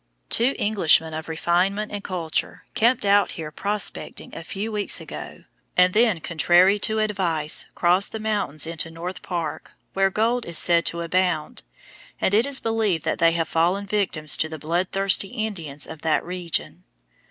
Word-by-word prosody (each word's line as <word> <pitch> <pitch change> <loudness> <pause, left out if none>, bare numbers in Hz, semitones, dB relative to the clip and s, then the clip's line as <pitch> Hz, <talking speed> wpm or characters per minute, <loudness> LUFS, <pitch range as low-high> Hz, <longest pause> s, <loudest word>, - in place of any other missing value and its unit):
Two 245 +4 +3
Englishmen 165 -6 +2
of 160 +1 -6
refinement 180 +6 0
and 205 -1 -5
culture 170 -4 -3
camped 235 -1 +2
out 200 0 +3
here 155 -2 -6
prospecting 205 +4 -3
a 165 - -7
few 200 +6 -5
weeks 210 -1 0
ago, - - -9 0.3
and 180 0 +5
then, 220 -5 +3
contrary 175 +5 +3
to 220 +1 0
advice, 180 -8 0
crossed 180 +3 +2
the 220 - -5
mountains 205 -9 0
into 165 0 -3
North 175 +3 -6
Park, 170 -4 -5 0.2
where 195 0 +3
gold 230 +5 0
is 170 -2 +1
said 170 0 +3
to 170 - -3
abound, 175 -2 -1 0.6
and 190 - +1
it 225 +6 +4
is 280 -1 +1
believed 220 -8 0
that - - -1
they 165 0 +4
have 165 -1 -1
fallen 175 +6 +1
victims 190 -7 -1
to 160 - 0
the 160 - -6
bloodthirsty 185 +5 +1
Indians 190 - -4
of 160 -2 -10
the 160 -1 +2
region. 180 -1 -4
180 Hz, 165 wpm, -23 LUFS, 165-205 Hz, 0.6 s, and